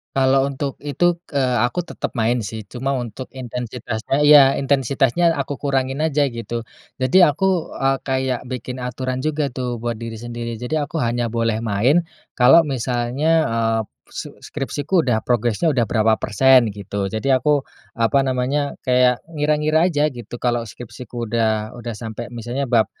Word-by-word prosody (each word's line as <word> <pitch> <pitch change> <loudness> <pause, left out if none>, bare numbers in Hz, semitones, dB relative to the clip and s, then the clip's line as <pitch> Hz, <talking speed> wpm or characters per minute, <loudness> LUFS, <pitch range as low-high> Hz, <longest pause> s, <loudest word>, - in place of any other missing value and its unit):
Kalau 135 0 +3
untuk 140 0 -4
itu, 170 +4 0 0.2
eee, 130 -3 +1
aku 125 +9 -1
tetap 175 - -6
main 120 0 +1
sih, 110 +3 -5
cuma 135 +2 -2
untuk 125 -1 -4
intensitasnya. 125 0 -3
Ya, 145 -2 +7
intensitasnya 140 +4 +2
aku 140 -1 -3
kurangin 135 +1 -1
aja 145 -2 +1
gitu. 115 -1 -5 0.4
Jadi 175 +8 +6
aku, 180 +3 0
eee, 135 0 +1
kayak 130 -2 -1
bikin 125 0 -6
aturan 130 +1 -4
juga 150 -2 0
tuh 125 -2 -4
buat 120 -1 -2
diri 115 0 -6
sendiri. 120 0 -5
Jadi 125 +7 -3
aku 150 +1 -2
hanya 120 -1 -1
boleh 115 -1 0
main 125 +11 +2 0.3
kalau 135 +7 +7
misalnya, 130 +1 -1 0.2
eee, 115 -1 +1 0.2
s - - -7
skripsiku 150 +4 -2
udah 120 -7 0
progresnya 120 +6 +1
udah 120 -4 +1
berapa 110 -1 +3
persen 125 +2 +5
gitu. 100 0 -3
Jadi 110 +7 -1
aku, 140 +2 +2 0.3
apa 115 +4 +3
namanya, 135 +2 -1
kayak 125 -1 +3
ngira-ngira 155 +2 +2
aja 150 -2 +1
gitu 120 -2 -9
kalau 120 -1 +1
skripsiku 120 +2 -8
udah, 110 -1 0
udah 120 -1 -6
sampai 115 +1 -6
misalnya 120 +3 -4
bab 115 -3 +4
125 Hz, 155 wpm, -21 LUFS, 120-140 Hz, 0.4 s, Ya